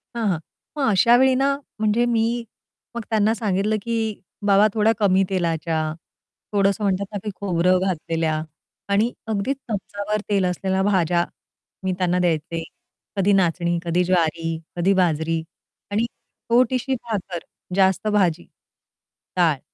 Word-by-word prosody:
हां, 230 -3 0
हां. 175 -4 0 0.4
मग 270 -4 +2
अशावेळी 240 +7 +5
ना, 275 +1 +2 0.2
म्हणजे 215 +2 +2
मी 235 0 +1 0.5
मग 235 - -2
त्यांना 220 0 +3
सांगितलं 210 -1 0
की, 225 -1 -2 0.3
"बाबा, 200 +1 +6
थोड्या 220 0 +3
कमी 195 -2 +4
तेलाच्या, 165 -3 0 0.8
थोडंसं 200 +1 +2
म्हणतात 200 0 +1
ना 205 - -3
ते, 215 - -3
खोबरं 185 -1 +2
घातलेल्या 165 -4 -1 0.5
आणि 220 +4 +3 0.2
अगदीच 220 +6 -1
चमचाभर 205 0 -3
तेल 200 -2 +2
असलेल्या 190 +1 0
भाज्या 175 -3 +2 0.6
मी 190 - 0
त्यांना 180 -1 +1
द्यायचे. 165 -1 0 0.5
कधी 200 +1 +3
नाचणी, 175 -2 +2
कधी 175 +2 +2
ज्वारी, 165 -2 +1 0.2
कधी 185 +3 +3
बाजरी 165 -3 +1 0.5
आणि 220 +3 +1 0.4
छोटीशी 255 +2 +2
भाकर, 205 -7 -4 0.4
जास्त 190 +1 +3
भाजी. 185 -6 +2 0.9
काय" 165 -6 +3
195 Hz, 130 wpm, -23 LUFS, 175-215 Hz, 0.9 s, बाबा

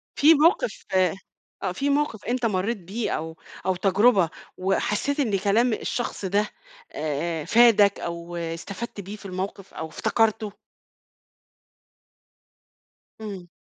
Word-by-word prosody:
في 310 +3 +7
موقِف 400 +11 +2
آه، 185 -2 +3 0.6
في 280 +9 -1
موقِف 285 -7 0
أنت 245 0 0
مرّيت 210 +2 0
بيه 200 +6 -4
أو 160 +1 -4 0.3
أو 190 - +2
تجربة 195 0 +4 0.3
وحسّيت 210 +9 0
إن 210 -8 +1
كلام 220 +5 +3
الشخص 235 -2 -3
ده 205 +3 +1 0.4
آآ، 155 +1 -2
فادك 220 -4 +5
أو 170 0 -5
استفدت 180 +6 -5
بيه 200 +3 -7
في 210 - -14
الموقِف 190 +1 -5
أو 160 - -5
افتكرته؟ 215 +5 0 2.7
امم. 195 -5 -7
200 Hz, 115 wpm, -25 LUFS, 180-235 Hz, 2.7 s, في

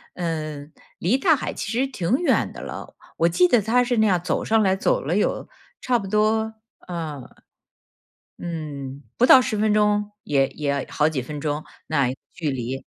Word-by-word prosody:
嗯， 155 -3 -4 0.2
离 190 +9 +1
大 320 +2 +4
海 270 - -4
其 - - -5
实 245 +3 +1
挺 195 -10 -3
远 345 +6 +1
的 - - -10
了， - - -8 0.2
我 165 +1 +3
记 360 - +4
得 245 -9 +4
它 235 +5 +3
是 245 -1 0
那 220 0 +4
样 185 -3 +3
走 - - -1
上 220 0 +3
来 190 -1 +3
走 - - +1
了 - - -1
有 - - 0 0.3
差 245 -2 +1
不 195 - -6
多， 220 +2 +1 0.3
呃， 160 -5 -5 1.2
嗯， 145 -5 -6
不 245 - +3
到 260 +1 +9
10 225 -3 -1
分 215 0 +2
钟， 210 0 +2
也 135 -2 +2
也 150 0 -5
要 140 -1 0
好 150 0 +2
几 145 -5 -2
分 150 +3 -6
钟， 150 0 -2 0.2
那 140 -5 +1 0.2
距 160 -5 -2
离。 130 0 -4
180 Hz, 195 characters per minute, -23 LUFS, 150-220 Hz, 1.2 s, 到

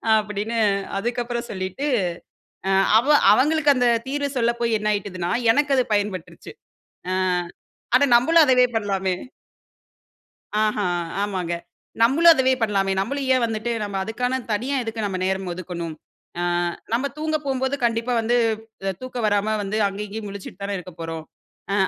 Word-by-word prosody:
அப்டின்னு 215 +1 -2 0.4
அதுக்கு 240 +4 -1
அப்புறம் 235 0 -4
சொல்லிட்டு 190 +7 -4 0.8
அ - - +2 0.3
அவ 245 +5 0 0.2
அவங்களுக்கு 295 +2 +4
அந்த 250 -1 +3 0.2
தீர்வு 285 +1 -1
சொல்ல 235 -1 +3
போய் 230 -2 +2
என்ன 210 0 -2
ஆயிட்டுதுன்னா, 185 -4 -3 0.2
எனக்கு 285 +2 +2
அது 255 - +3
பயன்பட்டுருச்சு. 200 -4 -3 0.6
ஆ - - +1 0.8
அட 270 - +4
நம்பளும் 320 +7 +5
அதவே 250 -2 +5
பண்ணலாமே. 195 -3 0 1.5
ஆஹா! 210 -2 0 0.4
ஆமாங்க. 185 -4 -2 0.5
நம்மளும் 315 +9 +7
அதவே 260 -2 +3
பண்ணலாமே 195 -3 +1
நம்மளும் 275 +7 -2
ஏன் 255 - +2
வந்துட்டு 225 +1 -2
நம்ம 200 -1 -4
அதுக்கான 250 +4 -1
தனியா 250 +7 -1
எதுக்கு 225 -1 -4
நம்ம 190 -2 -3
நேரம் 190 -1 -1
ஒதுக்கணும்? 170 -2 -5 0.5
ஆ - - -1 0.5
நம்ப 245 +4 +1
தூங்க 310 0 0
போம்போது 265 0 0
கண்டிப்பா 230 +1 0
வந்து 235 +2 +1 0.5
அ - - 0
தூக்கம் 255 -2 -5
வராம 205 +1 +1
வந்து 200 +2 -3
அங்கே 200 +2 -5
இங்கேயும் 210 +1 -6
முழிச்சிட்டு 200 0 -9
தானே 200 0 -2
இருக்க 180 0 -10
போறோம். 165 -1 -5 0.5
அ - - +1
220 Hz, 145 wpm, -23 LUFS, 195-255 Hz, 1.5 s, நம்மளும்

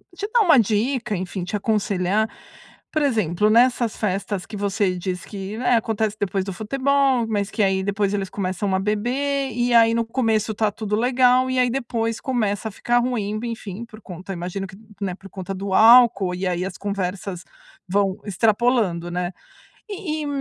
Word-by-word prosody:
te 400 +3 -4
dar 480 - +5
uma 320 -8 +6
dica, 225 +2 0
enfim, 185 0 -4
te 195 - -4
aconselhar, 210 -1 0 0.6
por 310 - 0
exemplo, 210 - +1
nessas 235 0 +3
festas 195 -1 -2
que 210 - -8
você 200 -2 0
diz 180 -1 -4
que, 200 +1 -6
né, 245 0 +2
acontece 220 -1 -1
depois 195 -1 -1
do 195 - -4
futebol, 265 +4 +1
mas 205 -2 -1
que 215 - 0
aí 190 -1 +2
depois 200 0 0
eles 195 -2 -2
começam 190 0 -2
a - - +1
beber, 260 +7 -1
e 240 +1 0
aí 230 -1 +6
no 230 0 0
começo 225 -2 0
está 215 0 +1
tudo 210 0 -3
legal, 250 +1 +3
e 255 - -1
aí 250 -1 +3
depois 230 -3 -2
começa 220 -5 -1
a - - -11
ficar 240 +4 +1
ruim, 220 -4 -1
enfim, 225 -2 -6
por 220 -1 -14
conta 185 +1 -8
imagino 185 +2 -4
que, 190 - -13 0.3
né, 190 -3 -2
por 195 +1 -14
conta 190 0 -6
do 195 0 -4
álcool, 220 -4 +6
e 185 +2 -3
aí 180 0 -1
as 190 -1 -6
conversas 195 -2 -4 0.4
vão 195 0 +1
extrapolando, 210 -3 +1
né. 175 0 -2 0.6
E 355 -7 -4
e - - -3
210 Hz, 180 wpm, -22 LUFS, 195-240 Hz, 0.6 s, uma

